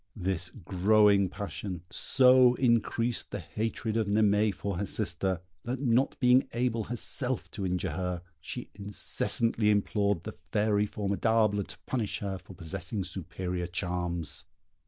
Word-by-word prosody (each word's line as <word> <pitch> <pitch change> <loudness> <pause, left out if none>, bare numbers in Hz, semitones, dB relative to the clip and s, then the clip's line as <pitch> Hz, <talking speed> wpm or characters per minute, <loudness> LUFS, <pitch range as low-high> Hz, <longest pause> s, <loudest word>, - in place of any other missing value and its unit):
This 90 -2 -2
growing 100 0 +3
passion 95 -2 -5
so 125 -1 +5
increased 120 -1 +1
the - - -4
hatred 110 0 -3
of 110 -2 +1
Naimée 105 0 +3
for 100 -1 -4
her 100 - 0
sister, 95 -1 -2 0.2
that 125 +2 -3
not 130 0 +2
being 125 +1 +5
able 120 -2 0
herself 125 +2 -2
to 100 -3 -3
injure 90 0 -1
her, 90 -2 -3 0.2
she 120 +8 -7
incessantly 105 +2 +1
implored 100 -3 +1
the - - -6 0.2
fairy 105 0 +2
Formidable 105 +1 +1
to - - -8
punish 115 -6 -1
her 95 -2 -4
for 95 +1 -13
possessing 90 +4 -4
superior 90 -1 -4
charms. 90 -2 -3
105 Hz, 135 wpm, -29 LUFS, 95-115 Hz, 0.2 s, so